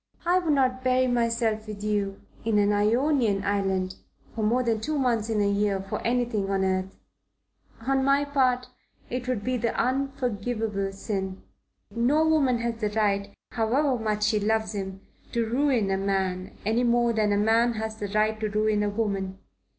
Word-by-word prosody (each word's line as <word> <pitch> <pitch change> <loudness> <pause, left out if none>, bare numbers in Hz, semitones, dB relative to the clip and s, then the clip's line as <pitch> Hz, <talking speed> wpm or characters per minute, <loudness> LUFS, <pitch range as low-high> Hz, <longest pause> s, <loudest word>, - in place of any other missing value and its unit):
"I 355 +2 +4
would 330 -4 +1
not 255 -2 +1
bury 255 0 +3
myself 230 -3 0
with 210 -1 -7
you 205 -2 -1 0.2
in 220 -2 +1
an 205 0 +3
Ionian 225 0 +2
island 190 -2 -1 0.4
for 225 - -4
more 240 +4 +2
than 225 -3 0
two 305 +5 -2
months 235 -5 +1
in 220 -2 0
a 200 - +2
year 200 -1 +1
for 195 +1 -5
anything 235 -4 0
on 195 -1 +1
earth. 185 0 -1 0.8
On 270 +3 +1
my 275 +1 +3
part, 255 -3 +1 0.5
it 250 0 -3
would 250 -5 -1
be 255 +2 0
the 235 0 -1
unforgivable 240 -6 -1
sin. 195 -1 -4 0.5
No 265 +8 +2
woman 280 -6 +3
has 235 -1 -2
the 210 - +1
right, 200 -2 0 0.2
however 255 +5 +1
much 215 -1 -1
she 215 0 +2
loves 220 +1 0
him, 190 -1 -5 0.3
to 235 -1 +1
ruin 245 -4 +1
a 190 - +1
man, 190 -1 -1
any 225 +3 +2
more 240 -1 +3
than 215 -2 +1
a 205 - +2
man 225 +3 +3
has 220 0 -4
the 205 - -4
right 215 +2 +1
to 215 -1 -1
ruin 215 0 +1
a 205 - +1
woman. 200 -3 -2
220 Hz, 175 wpm, -26 LUFS, 205-250 Hz, 0.8 s, I